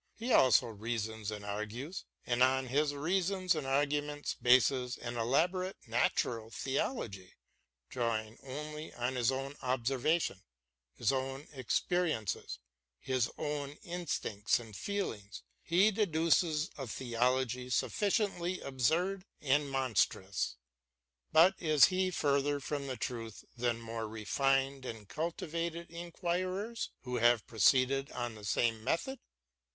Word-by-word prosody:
He 235 +2 -1
also 130 -1 +6
reasons 110 -1 -3
and 105 -1 -6
argues, 110 - -5 0.2
and 120 0 0
on 130 +1 +4
his 145 +3 +2
reasons 185 +4 +1
and 150 -4 -3
arguments 145 +1 0
bases 125 0 +3
an 120 0 -5
elaborate 175 +11 +1
natural 115 -1 0
theology. 115 - -3 0.5
Drawing 115 -3 -2
only 150 +3 -6
on 120 +2 -1
his 125 -1 +2
own 135 +2 -4
observation, 130 - 0 0.5
his - - +1
own 135 +1 -3
experiences, 135 - -1 0.4
his 130 -3 0
own 145 -2 -3
instincts 170 - -1
and 115 -4 -11
feelings, 115 - -4 0.2
he 190 +6 +4
deduces 165 -4 +2
a 135 - -4
theology 125 +1 0
sufficiently 185 - 0
absurd 165 +9 0 0.2
and 145 0 +2
mon 135 -3 -1
strous; 95 - +1 0.8
but 170 +4 +7
is 155 -2 +6
he 185 0 +2
further 145 -3 +1
from 140 0 -3
the 130 -2 -4
truth 115 -2 -5
than 120 -1 0
more 115 -1 -4
refined 135 +5 0
and 115 -5 -7
cultivated 170 +1 -3
inquirers 185 +6 -3
who 125 -1 -2
have 120 -1 +4
proceeded 130 +5 +3
on 120 -2 -3
the 105 -1 -12
same 110 +1 +1
method 170 - -1
135 Hz, 120 wpm, -33 LUFS, 120-165 Hz, 0.8 s, but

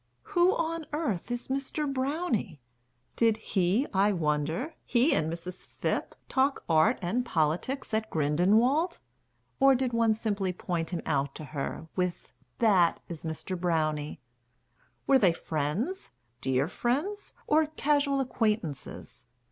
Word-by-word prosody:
Who 355 0 +4
on 330 -1 -2
earth 255 - -2
is 245 0 -3
Mr. 275 +3 -2
Brownie? 265 - -1 0.6
Did 225 -2 +3
he, 200 +3 +1
I 200 +2 +4
wonder, 160 - -1
he 245 +5 +3
and 155 +1 +1
Mrs. 175 +2 -7
Phipp - - -2
Talk 270 +1 +1
Art 165 +9 +4
and 230 +9 0
Politics 175 - -1
at 220 0 0
Grindelwald, 215 - +2 0.6
Or 270 0 +6
did 255 -1 -1
one 230 -1 +3
simply 200 -4 -1
point 170 -2 -3
him 175 -2 -4
out 140 0 0
to - - -7
her 145 +2 -4
With 180 -1 -2 0.2
"That 190 -7 +4
is 165 -3 -7
Mr. 160 +3 -4
Brownie?" 155 -4 -1 0.9
Were 270 -1 +5
they 185 -7 +4
friends, 165 - -3 0.3
Dear 130 +2 +1
friends, 295 - -2
or 310 +1 +3
casual 285 -2 +1
acquaintances? 215 - -3
215 Hz, 130 wpm, -29 LUFS, 165-270 Hz, 0.9 s, Or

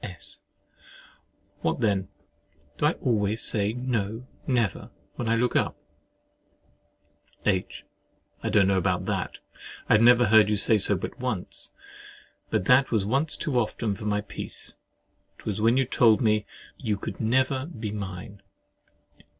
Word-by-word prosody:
S. 90 -3 -5 1.2
What - - 0
then, 100 -4 +1 0.7
do - - +4
I - - +2
always 110 -2 0
say—"No—never!" 115 +1 -1 0.2
when 120 - -3
I 115 - +3
look 120 +1 +1
up? - - +1 1.7
H. 95 -3 -1 0.6
I - - -2
don't 105 -2 +4
know 95 -1 +3
about 95 -1 0
that—I 100 +2 -2
never 120 +2 +6
heard 110 -1 +6
you 105 - +2
say 105 +1 +3
so - - +3
but - - -6
once; - - -4 0.8
but 90 - 0
that 130 +4 +5
was 110 -4 +1
once 135 +8 +1
too 130 -5 0
often 110 -1 -1
for 105 +2 -8
my 105 -1 0
peace. 100 - -7 0.6
It - - -18
was 105 -1 -2
when 115 +3 +4
you 135 - +3
told 115 -3 +4
me, 105 -3 +1 0.3
"you 105 -2 -1
could - - -6
never 130 +4 +1
be 110 -11 -5
mine." 100 0 -7
110 Hz, 135 wpm, -26 LUFS, 100-120 Hz, 1.7 s, never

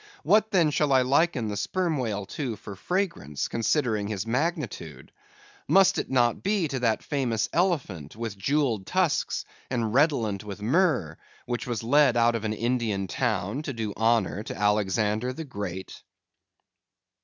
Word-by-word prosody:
What 215 +1 +4
then 170 -7 +3
shall 150 0 +1
I 130 -1 +5
liken 135 -2 +2
the 105 - -3
Sperm 175 - -1
Whale 105 -6 -2
to 120 +2 -4
for 100 -1 -9
fragrance, 165 - -2
considering 115 -3 0
his 105 -1 -3
magnitude? 150 +8 -3 0.6
Must 195 -1 +5
it - - -4
not 120 -3 +2
be 200 -4 +1
to 135 - -2
that 115 -3 +1
famous 125 -7 -1
elephant, 135 - -1
with 115 -2 -5
jewelled 115 -1 0
tusks, 180 -6 0 0.2
and 115 -4 -1
redolent 120 -9 +2
with 105 -1 -7
myrrh, 125 - +1 0.3
which 120 0 -3
was 120 -2 -3
led 135 0 +4
out 120 0 +4
of 115 -1 -3
an 110 - 0
Indian 115 -4 -1
town 110 +2 -1
to 150 -2 -5
do 110 -3 -3
honor 110 -3 +1
to - - -7
Alexander 105 +3 +1
the 160 - -6
Great? 100 -7 -6
120 Hz, 155 wpm, -26 LUFS, 105-150 Hz, 0.6 s, I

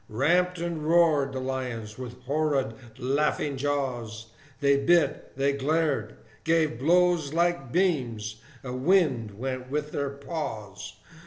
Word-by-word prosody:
Ramped 175 +10 +2
and 170 -2 -3
roared 155 -4 +4
the 130 - -4
lions, 125 -4 -4
with 125 0 -8
horrid 140 -3 0 0.2
laughing 140 +2 0
jaws; 125 -6 -3 0.3
They 140 -1 +4
bit, 170 +4 +2
they 140 +1 +2
glared, 140 -5 0 0.3
gave 160 -6 +2
blows 170 0 +3
like 170 -6 +1
beams, 120 - 0 0.2
a 125 -2 -5
wind 130 - +2
went 130 +1 -4
with 150 +1 -2
their 140 -1 -1
paws. 135 - -6
140 Hz, 120 wpm, -27 LUFS, 125-160 Hz, 0.3 s, roared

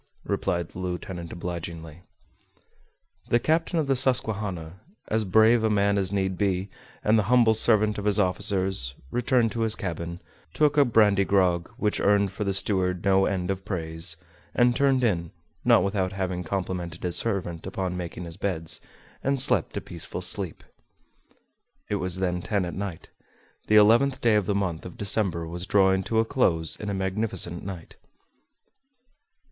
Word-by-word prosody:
replied 85 -3 -1
the - - -10
lieutenant 90 -1 -5
obligingly. 85 -2 -7 1.3
The 120 - +4
captain 165 +5 0
of 160 - +1
the 135 -1 +1
Susquehanna, 105 -9 +2 0.3
as 110 0 +1
brave 110 +4 +4
a 110 - +2
man 100 -1 +2
as 95 -1 0
need 95 -2 -1
be, 95 -1 -1 0.3
and 110 +1 +4
the - - +1
humble 120 -3 +5
servant 110 -1 +2
of 100 - -6
his 105 -1 +4
officers, 95 -7 +1 0.2
returned 120 -2 +1
to 115 - -5
his 110 -1 +1
cabin, 85 -3 -5 0.4
took 150 -1 +3
a 145 -1 +5
brandy 105 -5 +4
grog, 90 -3 +1
which 105 -4 0
earned 100 -1 +2
for 100 +2 -4
the 100 - -1
steward 90 -2 0
no 95 0 +4
end 95 -1 -1
of 95 0 -5
praise, 85 -3 -4 0.4
and 120 0 +3
turned 135 -2 +2
in, 85 -7 0 0.3
not - - +5
without 95 -1 -1
having 95 -2 -3
complimented 90 -1 -4
his 90 -1 0
servant 95 -6 -2
upon 95 -1 -3
his 90 - -5
making 85 0 -6
beds, 80 -5 -1 0.4
and 140 0 +1
slept 130 - +2
a - - -2
peaceful 85 +1 -5
sleep. 90 -1 -2 1.3
It 105 - +1
was 90 -2 -2
then 90 -1 -1
ten 100 0 -1
at 85 - -5
night. 95 -4 -6 0.6
The 110 - +3
eleventh 115 +6 +5
day 115 -2 +3
of 105 -3 +1
the 100 - 0
month 90 -5 -2
of 90 - -10
December 95 -5 0
was 85 +2 -5
drawing 95 -1 +3
to 115 - -1
a 110 - +3
close 85 - +1
in 105 - -6
a - - -2
magnificent 95 -2 -1
night. 90 -4 -8
95 Hz, 165 wpm, -26 LUFS, 90-110 Hz, 1.3 s, humble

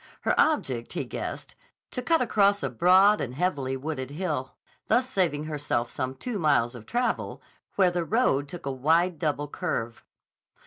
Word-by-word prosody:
Her - - +1
object 130 - +1
he - - -2
guessed; - - -6 0.4
to 250 - -3
cut 330 +4 +2
across 200 -3 +2
a - - -1
broad 190 +4 +5
and 125 -1 -4
heavily 140 -6 -1
wooded 130 -2 -4
hill, 150 -4 -3 0.3
thus 255 +1 +3
saving 175 - 0
herself 145 -6 -2
some 130 +1 -3
two 220 - -4
miles 140 -7 +2
of 120 -3 -11
travel 245 +1 -1 0.4
where 185 -3 +4
the 175 -1 -1
road 165 - +1
took 175 +1 -9
a 140 - -1
wide 160 +6 +2
double 145 -1 -1
curve. 115 -4 -4
155 Hz, 165 wpm, -27 LUFS, 135-190 Hz, 0.4 s, broad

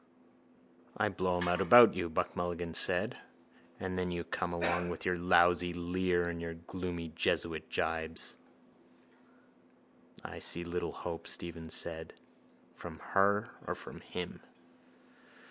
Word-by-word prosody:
—I - - +2
blow 90 -1 0
him 90 0 0
out 90 +2 +2
about 115 +5 +9
you, 90 -2 -2
Buck 80 - -1
Mulligan 85 -1 -3
said, - - +2 0.6
and 90 -1 -3
then 90 0 -1
you 85 -1 -3
come 85 - -3
along 85 +1 0
with 85 - -5
your 90 - +2
lousy 90 0 +4
leer 90 0 0
and 85 -1 -4
your 85 0 -5
gloomy 85 0 -5
jesuit 80 0 -1
jibes. 80 0 -1 1.9
—I - - -7
see 85 - +2
little 85 +1 -3
hope, 85 -1 -6
Stephen 85 -1 -3
said, 80 0 -1 0.6
from - - -9 0.2
her 100 +1 +3 0.2
or - - -1
from - - -10
him. 90 -1 -6
85 Hz, 130 wpm, -33 LUFS, 85-90 Hz, 1.9 s, about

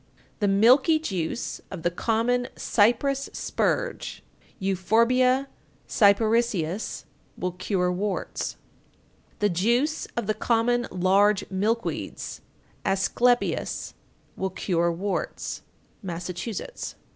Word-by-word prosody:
The 205 - +2
milky 250 - +5
juice 195 - -3
of 185 -4 -7
the 175 - +2
common 235 +6 +1
cypress 255 +6 +2
spurge - - -2 0.3
(Euphorbia 230 +7 +2 0.4
Cyparissias) 210 -3 +2 0.3
will 180 - -2
cure 180 0 0
warts. 195 +1 -3 0.9
894. - - +6
The 195 - -1
juice 240 - +1
of 235 - 0
the 215 - +1
common 240 +2 +1
large 195 +3 +3
milk 220 +5 0
weeds - - -5 0.4
(Asclepias) 235 +6 +1 0.4
will 190 - -2
cure 170 -2 0
warts. 190 +4 -3 0.4
_Massachusetts. 180 - -5
210 Hz, 95 wpm, -26 LUFS, 185-240 Hz, 0.9 s, 894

